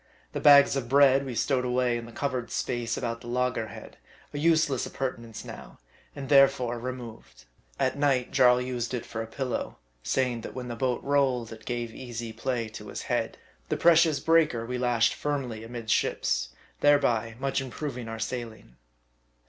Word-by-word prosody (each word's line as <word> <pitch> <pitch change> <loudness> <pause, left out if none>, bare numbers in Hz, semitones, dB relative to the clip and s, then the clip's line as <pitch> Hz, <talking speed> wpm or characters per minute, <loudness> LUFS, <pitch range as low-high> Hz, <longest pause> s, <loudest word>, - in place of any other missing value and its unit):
The - - -3
bags 140 -1 +7
of 125 -4 -3
bread 135 0 +5
we 125 - -5
stowed 130 +1 +1
away 125 -1 +1
in 120 0 -5
the - - -11
covered 130 -2 -3
space 120 -2 -2
about 115 -1 -3
the - - -11
loggerhead, 125 -2 -3 0.4
a 145 - -3
useless 155 -5 +2
appurtenance 115 -4 -5
now, - - -10 0.4
and 140 -2 -6
therefore 130 -4 +4
re 125 +2 -3
moved. 115 - -11 0.3
At 140 - 0
night, 135 -4 +1
Jarl 125 -2 +5
used 125 -1 -3
it 120 - -5
for 110 - -5
a 115 - -5
pillow; 125 +1 -4 0.2
saying, 125 - 0
that - - -8
when 125 -1 -5
the 120 - -4
boat 125 0 -1
rolled 130 -5 +1
it 110 0 -13
gave 120 -2 -3
easy 120 -3 -6
play 115 0 -2
to 110 - -10
his - - -6
head. - - -2 0.3
The - - 0
precious 165 -3 +5
breaker 155 -7 +2
we 125 +1 -3
lashed 120 -2 +2
firmly 130 -7 -3
amidships; 115 - -1 0.3
thereby 120 -6 +3
much 135 +1 -1
improving 130 -2 -5
our 115 0 -5
sailing. 110 - -6
125 Hz, 170 wpm, -27 LUFS, 115-135 Hz, 0.4 s, bags